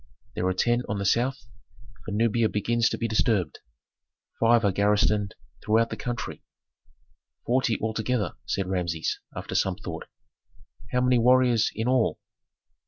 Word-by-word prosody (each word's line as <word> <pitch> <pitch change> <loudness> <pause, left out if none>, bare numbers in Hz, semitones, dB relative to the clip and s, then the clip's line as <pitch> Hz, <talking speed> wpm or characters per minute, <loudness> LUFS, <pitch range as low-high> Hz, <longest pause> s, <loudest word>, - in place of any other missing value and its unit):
There 90 - -1
are 95 - +1
ten 120 +5 +2
on 100 - -1
the 100 - -3
south, 120 +4 +1 0.6
for - - -7
Nubia 115 +1 +2
begins 115 +2 +1
to - - -3
be 115 - -1
disturbed; 105 -6 0 0.8
five 115 -1 +4
are 100 - +3
garrisoned 105 0 +1 0.3
throughout 115 +2 +2
the - - -2
country." 120 -1 -5 1.0
"Forty 125 -2 +1
altogether," 110 +1 -1
said 100 -1 -1
Rameses, 90 -3 -2 0.2
after - - -6
some 95 -2 +1
thought. 85 -5 -7 0.8
"How 125 - +1
many 125 -1 +3
warriors 125 -1 +4
in 110 +2 -2
all?" 125 -2 +2
110 Hz, 140 wpm, -26 LUFS, 100-120 Hz, 1.0 s, five